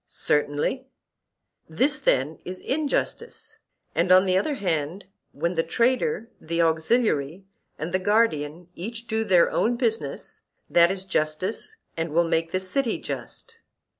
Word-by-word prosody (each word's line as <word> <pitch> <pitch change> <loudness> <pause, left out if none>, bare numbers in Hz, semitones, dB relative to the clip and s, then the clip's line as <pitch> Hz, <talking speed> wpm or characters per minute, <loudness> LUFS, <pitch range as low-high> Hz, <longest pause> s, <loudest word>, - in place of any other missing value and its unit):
Certainly. 150 - -1 0.8
This 270 - +2
then 145 - +1
is 185 +1 -6
injustice; 290 +1 -2 0.3
and 185 - +1
on 185 +1 +7
the 185 -1 +2
other 280 +10 +1
hand 175 - -2 0.3
when 170 +6 -1
the 165 - +2
trader, 240 - 0
the 170 +1 -3
auxiliary, 165 - +1 0.3
and 160 +3 -5
the 185 - +2
guardian 175 -6 +1
each 230 +7 -6
do 220 -1 -1
their 185 -5 +4
own 240 +2 +1
business, 230 -2 -2 0.3
that 170 0 +5
is 190 0 -3
justice, 185 - -1 0.2
and 165 -1 -3
will 170 +2 +4
make 165 0 +1
the 185 - 0
city 225 +7 0
just. 465 -1 -7
185 Hz, 135 wpm, -25 LUFS, 165-230 Hz, 0.8 s, on